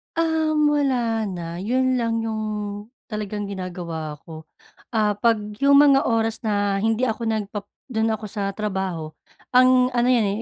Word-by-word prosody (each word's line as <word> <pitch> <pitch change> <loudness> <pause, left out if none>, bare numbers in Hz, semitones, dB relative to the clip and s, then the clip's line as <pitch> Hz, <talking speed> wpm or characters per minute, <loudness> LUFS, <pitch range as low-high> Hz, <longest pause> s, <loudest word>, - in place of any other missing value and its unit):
Um, 315 -2 +2
wala 240 -7 +1
na. 170 -2 -5
'Yun 255 +5 +1
lang 230 -1 0
'yung 220 -1 -2 0.7
talagang 210 -1 -4
ginagawa 175 -5 -5
ko. 160 -1 -11 0.5
Ah, 210 -2 +1
‘pag 230 +1 +3 0.2
'yung 280 0 +5
mga 280 0 +6
oras 225 -1 0
na 205 -2 +1
hindi 225 +3 0
ako 230 -1 -1
nag-pap 205 -2 -3 0.3
dun 220 -1 +1
ako 215 -1 -4
sa 200 -2 -2
trabaho, 190 -7 -3 0.4
ang 255 0 +5
ano 240 0 +1
’yan 230 -5 +3
220 Hz, 145 wpm, -23 LUFS, 200-250 Hz, 0.7 s, mga